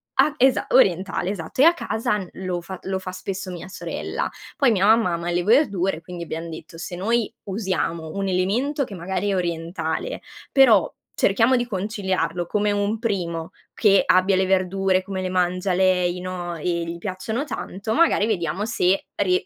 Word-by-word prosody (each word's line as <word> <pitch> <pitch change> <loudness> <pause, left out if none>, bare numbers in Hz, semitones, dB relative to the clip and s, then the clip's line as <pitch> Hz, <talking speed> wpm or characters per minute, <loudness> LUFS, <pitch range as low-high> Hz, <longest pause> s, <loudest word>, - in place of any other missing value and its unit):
ah, 305 - +4
esa 260 0 +3
orientale, 190 -5 +3
esatto, 205 +5 -3
e - - +8
a 335 +2 +7
casa 220 -10 -1
n 190 -4 -6
lo 180 -1 -2
fa 190 +2 -7
lo 190 0 -2
fa 185 0 -6
spesso 185 0 -5
mia 175 +1 -8
sorella, - - -4 0.3
poi 275 -4 +4
mia 195 -3 +2
mamma 220 -4 +4
ama 170 +1 -3
le 175 0 0
verdure 200 - +2
quindi 175 0 -7
abbiam 165 0 -5
detto: 165 +1 -10
"Se 170 +1 -6
noi 225 +4 0
usiamo 185 -5 -2
un 195 0 -2
elemento 220 +11 0
che 210 -6 -7
magari 190 +3 -2
è 195 - +1
orientale, 175 - -3 0.3
però 235 -9 +5 0.2
cerchiamo 225 +6 +3
di 240 -1 0
conciliarlo 190 -4 -2
come 210 +1 +1
un 205 +2 0
primo 180 -7 -2 0.2
che 200 -3 +5
abbia 185 +1 +4
le 190 0 +2
verdure, 190 0 +1
come 190 -1 -4
le 185 - -2
mangia 180 +1 0
lei, 180 -1 +2
no, 180 -1 -5
e 155 - -9 0.2
gli 170 +1 -5
piacciono 205 +7 -3
tanto, 220 -6 -4
magari 325 -9 +4
vediamo 190 -2 -1
se 195 -4 +1
rie 180 -2 +1
190 Hz, 175 wpm, -23 LUFS, 180-210 Hz, 0.3 s, e